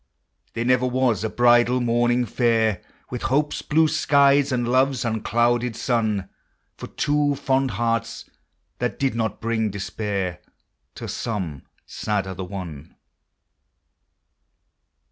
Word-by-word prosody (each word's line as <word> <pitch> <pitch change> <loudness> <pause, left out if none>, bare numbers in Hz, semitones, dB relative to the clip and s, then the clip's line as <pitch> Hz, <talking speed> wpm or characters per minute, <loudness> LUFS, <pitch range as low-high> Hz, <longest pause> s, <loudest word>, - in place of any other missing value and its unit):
There 115 +1 -2
never 125 0 +3
was 125 -5 +1
a 110 - -1
bridal 120 +2 +4
morning 120 +1 +2
fair 115 -3 +1 0.3
With 125 - -4
hope's 145 +3 0
blue 160 +1 +3
skies 140 -1 +3
and 120 -2 0
love's 130 +1 +2
unclouded 120 +1 0
sun 110 -6 0 0.5
For - - -8
two 145 -1 0
fond 135 -1 +1
hearts, 115 +1 -2 0.5
that - - -2
did 135 -3 0
not 110 -2 -2
bring 110 -1 0
despair 100 -2 -3 0.6
To - - -7
some 90 - -4 0.2
sad 105 -2 -2
other 95 0 -6
one. 90 -5 -8
120 Hz, 115 wpm, -23 LUFS, 105-130 Hz, 0.6 s, bridal